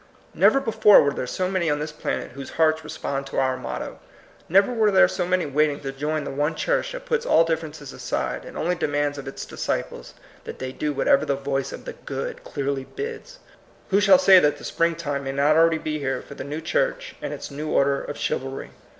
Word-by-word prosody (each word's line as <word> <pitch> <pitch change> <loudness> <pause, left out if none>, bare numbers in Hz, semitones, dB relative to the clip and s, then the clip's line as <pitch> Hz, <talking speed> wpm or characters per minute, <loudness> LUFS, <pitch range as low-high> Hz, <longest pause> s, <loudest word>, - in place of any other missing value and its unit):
Never 275 - +5
before 220 -5 +6
were 140 -1 +1
there 125 - -4
so 185 +8 -1
many 185 -3 0
on 150 - +1
this 150 +1 -4
planet 150 - -4
whose 135 +1 -8
hearts 160 -1 +3
respond 140 -3 -4
to - - -6
our 130 -1 +1
motto. 130 - -6 0.5
Never 195 +7 +4
were 220 -3 +3
there 190 -2 +6
so 180 -2 -2
many 185 0 +1
waiting 145 0 +1
to 135 -1 -4
join 150 +3 -2
the - - -5
one 150 +3 -1
church - - 0
that - - -7
puts 470 -1 0
all 475 - +5
differences 155 -3 -4
aside, - - -3
and - - -10
only 175 +2 0
demands 145 -3 -1
of 135 - -9
its 135 - -6
disciples - - -4 0.3
that - - -8
they 130 0 -5
do 150 +3 -2
whatever 275 - +3
the 140 - 0
voice 135 0 -2
of - - -9
the - - -6
Good - - -6
clearly 140 -1 -3
bids. 465 - -7 0.5
Who 200 +2 +4
shall 205 +6 +7
say 195 -9 +7
that 150 -3 +2
the - - -13
springtime 160 -4 -1
may 135 - -3
not 145 +2 +3
already 165 0 +4
be 155 -1 -3
here 135 -2 -2
for - - -11
the - - -7
new 150 +3 -5
church - - -1
and - - -4
its - - -7
new 150 +2 -5
order 140 0 +2
of 145 - -6
chivalry? 135 +1 -3
155 Hz, 220 wpm, -24 LUFS, 140-185 Hz, 0.5 s, shall